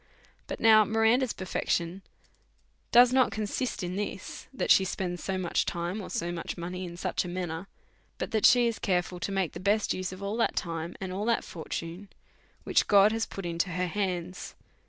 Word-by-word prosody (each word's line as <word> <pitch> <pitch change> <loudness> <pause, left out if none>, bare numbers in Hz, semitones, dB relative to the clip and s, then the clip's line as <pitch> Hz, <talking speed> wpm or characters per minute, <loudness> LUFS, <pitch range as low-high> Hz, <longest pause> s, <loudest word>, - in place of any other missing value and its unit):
But - - -5
now 220 -1 +7
Miranda's 225 +3 +2
perfection 180 -1 -2 0.9
does 245 +1 +7
not 260 -2 +4
consist 215 +3 -3
in 180 +1 -3
lis, 200 -2 -5
that 265 - 0
she 190 - +7
spends 180 -1 -3
so 190 -1 -2
much 180 -2 0
time, 175 +5 -3
or - - -8
so 170 +1 -2
much 170 -1 -5
money 180 +2 -5
in 170 -1 -8
such - - -1
a - - -6
manner, 175 0 -4 0.5
but - - -4
that 220 -2 +5
she 245 -1 +5
is 230 -2 -1
careful 180 -1 -1
to 195 - -3
make 190 -4 0
the - - -7
best 205 +3 +1
use 185 -1 -3
of 185 +1 -9
ail 200 +2 -2
that 230 - +1
time, 165 -1 -3
and 190 -1 -5
all 200 +3 -2
that 235 0 +1
fortune, 170 +3 -6 0.5
which - - +2
God 200 +1 +6
has 225 0 -1
put 195 - -7
into 170 +2 -1
her 180 +1 -1
hands. 180 -1 -3
190 Hz, 195 wpm, -28 LUFS, 175-215 Hz, 0.9 s, now